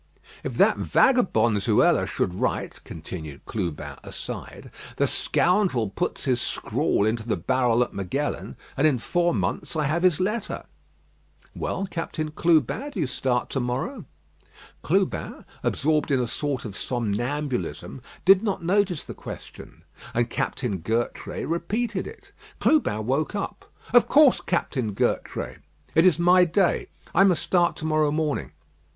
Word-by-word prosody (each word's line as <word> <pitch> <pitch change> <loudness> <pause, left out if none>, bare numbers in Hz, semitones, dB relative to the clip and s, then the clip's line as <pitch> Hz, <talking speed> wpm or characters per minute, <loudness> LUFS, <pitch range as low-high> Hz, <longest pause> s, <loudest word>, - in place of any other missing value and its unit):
"If - - -4
that - - +5
vagabond 120 - +3
Zuela - - +3
should 90 - -1
write - - -2
(continued 80 -3 -8
Clubin 90 -8 -4
aside), - - -8 0.3
the - - +3
scoundrel 175 - +2
puts - - -2
his 125 -3 +1
scrawl 100 - 0
into 110 +1 -1
the 110 - 0
barrel 125 +4 +2
at - - -7
Magellan, 130 +10 -3 0.2
and 140 +3 +4
in 140 -4 +2
four 175 +8 +1
months - - -2
I 155 - +1
have 155 +4 0
his 180 -3 +3
letter." 210 +3 -2 0.9
"Well, 195 - -2
Captain 165 -3 -4
Clubin, 165 - +2
do - - -6
you - - +2
start 125 -1 -1
to 135 - -1
morrow?" 135 - -3 0.8
Clubin, - - -1 0.2
absorbed 155 +1 +1
in 135 -2 +2
a 125 - +1
sort 140 +2 -3
of 105 -3 -6
somnambulism, 125 +4 -2 0.2
did 190 +1 +7
not 200 -6 -2
notice 185 -2 +1
the - - -7
question; - - -10 0.3
and 120 0 +1
Captain 110 -8 -2
Gertrais 115 +8 -2
repeated 200 +6 -2
it. 445 - -13 0.3
Clubin 110 - +2
woke 140 - 0
up. 200 0 -5 0.2
"Of 245 - +6
course, 295 -3 +5
Captain 130 - -1
Gertrais. - - -2 0.3
It 165 +3 +5
is 175 - +4
my 180 +1 +6
day. 180 +1 +1 0.3
I 195 - +6
must 180 -4 +3
start 175 0 +2
to 155 - -7
morrow 155 -1 +2
morning." 150 -1 -1
150 Hz, 145 wpm, -25 LUFS, 120-185 Hz, 0.9 s, did